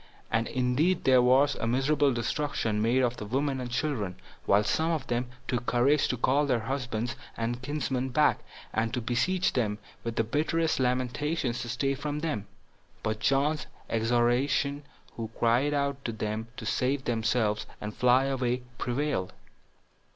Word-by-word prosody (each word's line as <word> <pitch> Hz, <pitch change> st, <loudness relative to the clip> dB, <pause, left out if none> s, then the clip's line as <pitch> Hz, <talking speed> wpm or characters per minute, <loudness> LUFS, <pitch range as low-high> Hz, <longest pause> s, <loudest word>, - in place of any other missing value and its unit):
And 115 Hz, 0 st, +1 dB
indeed 130 Hz, +8 st, +1 dB
there 130 Hz, -1 st, +6 dB
was 135 Hz, +3 st, +5 dB
a 115 Hz, -, -3 dB
miserable 140 Hz, +4 st, +2 dB
destruction 120 Hz, -3 st, -1 dB
made 120 Hz, +4 st, +3 dB
of 125 Hz, 0 st, 0 dB
the 105 Hz, -, -5 dB
women 135 Hz, +3 st, 0 dB
and 125 Hz, -, -4 dB
children; 120 Hz, -, -1 dB, 0.3 s
while 100 Hz, +2 st, +5 dB
some 160 Hz, +9 st, +1 dB
of 160 Hz, -6 st, -1 dB
them 120 Hz, 0 st, -1 dB, 0.2 s
took 120 Hz, -1 st, -2 dB
courage 135 Hz, +4 st, +3 dB
to 125 Hz, -, -1 dB
call 140 Hz, +5 st, +2 dB
their 125 Hz, -4 st, +1 dB
husbands 120 Hz, -1 st, -2 dB, 0.2 s
and 120 Hz, +2 st, -2 dB
kinsmen 130 Hz, -2 st, -2 dB
back, 150 Hz, +4 st, +3 dB, 0.3 s
and 115 Hz, 0 st, 0 dB
to -, -, 0 dB
beseech 130 Hz, +11 st, +1 dB
them, 105 Hz, -5 st, 0 dB, 0.3 s
with 115 Hz, -1 st, -3 dB
the 115 Hz, -, +2 dB
bitterest 155 Hz, +7 st, 0 dB
lamentations, 130 Hz, +1 st, 0 dB
to 120 Hz, -, -5 dB
stay 135 Hz, +3 st, 0 dB
for 140 Hz, +2 st, -4 dB
them; 150 Hz, -9 st, -2 dB, 0.6 s
but 110 Hz, 0 st, -1 dB
John's 145 Hz, +3 st, +1 dB, 0.2 s
exhortation, 120 Hz, +5 st, +2 dB, 0.4 s
who 115 Hz, -2 st, -4 dB
cried 120 Hz, +5 st, +3 dB
out 140 Hz, -1 st, -1 dB
to 115 Hz, -, -1 dB
them 110 Hz, 0 st, -3 dB
to 110 Hz, -, -6 dB
save 130 Hz, +4 st, 0 dB
themselves, 110 Hz, -2 st, 0 dB
and 105 Hz, 0 st, -6 dB
fly 125 Hz, +2 st, +4 dB
away, 125 Hz, -2 st, -1 dB, 0.2 s
prevailed. 125 Hz, -6 st, -1 dB
125 Hz, 160 wpm, -28 LUFS, 115-140 Hz, 0.6 s, there